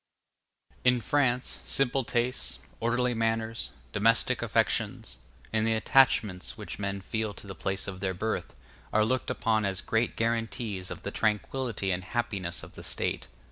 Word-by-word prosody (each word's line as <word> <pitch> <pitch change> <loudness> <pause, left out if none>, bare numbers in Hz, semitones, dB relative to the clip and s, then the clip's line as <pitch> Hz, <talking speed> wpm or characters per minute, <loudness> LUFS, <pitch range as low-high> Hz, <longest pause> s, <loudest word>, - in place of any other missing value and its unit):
In 125 0 +5
France, 130 -1 +1
simple 135 0 +2
tastes, 120 +2 0 0.2
orderly 120 +2 +1
manners, 115 - -1 0.2
domestic 115 +3 +3
affections, - - +1 0.4
and 110 0 +2
the 115 - +3
attachments 110 - +3
which - - -6
men 100 -1 -2
feel 110 +1 -2
to - - -9
the 95 - -6
place 95 +2 -1
of 95 -2 -5
their 95 -1 -1
birth, 110 +4 -2 0.4
are 110 0 +4
looked 130 +3 0
upon 110 -2 +1
as 95 -2 0
great 115 +2 0
guarantees 115 -4 -1
of - - -7
the 100 - -3
tranquillity 110 -1 0
and 90 0 -1
happiness 100 -6 -2
of - - -11
the - - -9
State. 65 - -2
110 Hz, 150 wpm, -29 LUFS, 100-120 Hz, 0.4 s, In